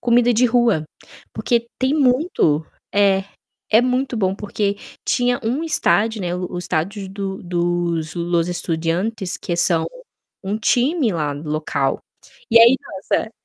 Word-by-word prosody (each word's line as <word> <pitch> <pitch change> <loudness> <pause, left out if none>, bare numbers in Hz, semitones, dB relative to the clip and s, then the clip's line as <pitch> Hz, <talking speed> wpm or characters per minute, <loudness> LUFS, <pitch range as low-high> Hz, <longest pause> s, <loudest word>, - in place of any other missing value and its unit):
comida 240 0 +3
de 245 +3 +3
rua, 230 -9 +2 0.5
porque 235 -1 0
tem 265 +3 +1
muito 250 - +2 0.3
é. 195 -1 +3 0.5
É 220 - +7
muito 255 0 0
bom 190 -2 +1
porque 205 0 -2 0.3
tinha 245 0 +1
um 265 +8 -1
estádio, 220 -8 +1
né, 175 0 -2
o 180 0 -3
o 175 - -3
estádio 190 +4 -3
do 195 0 -5
dos 175 -2 -1
Los 170 0 0
Estudiantes 175 +4 -2
que 175 - -3
são 170 -2 +2 0.6
um 205 +3 -2
time 255 +3 +2
lá 150 -3 -1
do 150 +2 -8
local, 145 -3 -1 0.5
e - - +7
aí, 235 +3 +7 0.2
nossa 200 +3 -1
200 Hz, 145 wpm, -20 LUFS, 175-240 Hz, 0.6 s, É